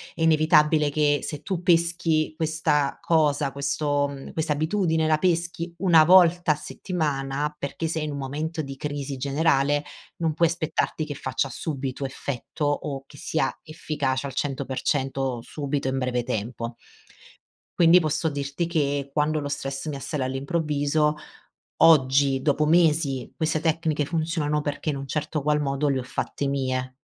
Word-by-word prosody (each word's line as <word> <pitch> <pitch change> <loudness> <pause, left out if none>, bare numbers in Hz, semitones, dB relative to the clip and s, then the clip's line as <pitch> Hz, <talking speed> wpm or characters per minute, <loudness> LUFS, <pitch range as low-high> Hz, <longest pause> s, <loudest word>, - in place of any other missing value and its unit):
è 165 - -7
inevitabile 155 -1 +4
che 145 0 +2
se 150 -2 -5
tu 185 0 -3
peschi 170 -2 +2
questa 155 -3 0
cosa 150 -3 +2
questo 145 +1 0
mhmm, 140 -1 -9
questa 155 -1 0
abitudine 160 +1 +1
la 155 -1 +3
peschi 170 0 -1
1 170 -4 +6
volta 175 -1 +6
a - - -6
settimana 150 -3 -3
perché 150 +3 -3
sei 160 -1 -2
in 150 - -3
un 140 - -5
momento 150 +4 -3
di 135 -2 -7
crisi 145 -1 -4
generale 145 +1 +1 0.3
non 165 -2 0
puoi 170 0 +3
aspettarti 160 -1 -1
che 145 - -6
faccia 130 +1 -2
subito 135 0 -4
effetto 135 +2 -4
o 145 -1 -2
che 145 - -15
sia 160 +3 -1
efficace 145 -4 -2
al 135 - -8
100% 135 0 -1
o 130 -3 -2
subito 140 +1 -3
in 130 0 -1
breve 125 -2 -1
tempo. 115 0 -4 1.0
Quindi 170 +1 +7
posso 160 0 0
dirti 140 +3 -3
che 145 -4 -1
quando 155 +1 +1
lo 145 - -4
stress 135 0 -4
mi 150 -2 -3
assale 135 +1 -3
all'improvviso, 145 +2 0 0.6
oggi, 135 -3 +5
dopo 150 +2 +2
mesi, 155 -5 +2
queste 160 -1 0
tecniche 160 -2 0
funzionano 155 -1 -1
perché 145 +1 -3
in 145 - -1
un 135 0 -6
certo 150 +2 -2
qual 150 +1 +1
modo 140 +1 0
le 135 -2 +1
ho - - -4
fatte 130 +3 -3
mie 130 -2 -2
150 Hz, 155 wpm, -25 LUFS, 135-160 Hz, 1.0 s, Quindi